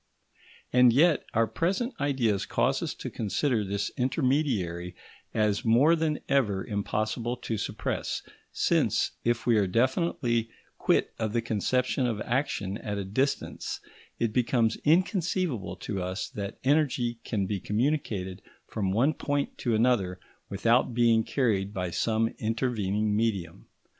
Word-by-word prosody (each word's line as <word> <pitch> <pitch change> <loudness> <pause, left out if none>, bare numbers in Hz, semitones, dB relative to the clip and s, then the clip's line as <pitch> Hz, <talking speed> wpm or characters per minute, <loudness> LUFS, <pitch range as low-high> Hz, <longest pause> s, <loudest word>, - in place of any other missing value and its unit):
And 125 -1 +7
yet 155 +6 +4
our 115 +1 +4
present 185 - -1
ideas 125 -8 +1
cause - - +1
us - - -3
to - - -6
consider 115 +2 0
this 100 +1 -2
intermediary 125 - 0 0.4
as 105 0 +1
more 130 +8 +5
than 155 -2 -1
ever 110 -9 +1
impossible 110 +3 -2
to 115 - -3
suppress; 105 - -3 0.3
since, - - +1
if 120 0 0
we 115 -2 +4
are 100 -2 +3
definitely 120 - +1 0.3
quit - - +2
of 110 -2 -1
the 120 - +1
conception 125 +3 0
of 110 -3 -2
action 110 -6 -1
at 105 -1 -4
a 100 - -3
distance, 130 +9 -2 0.4
it 115 -2 0
becomes 115 -2 +2
inconceivable 170 - +1
to 95 +2 -4
us 90 +2 -3
that 100 -1 -6
energy 130 -4 +1
can 100 -4 -1
be 100 0 -2
communicated 105 - -1 0.2
from 100 -3 -2
one 125 +10 +3
point 145 -1 -2
to 120 -3 +1
another 110 -6 +2 0.3
without 115 +4 +2
being 115 -2 +4
carried 105 -7 0
by 90 -2 -2
some 110 +4 +1
intervening 110 -3 0
medium. 100 -7 -2
115 Hz, 135 wpm, -28 LUFS, 100-130 Hz, 0.4 s, And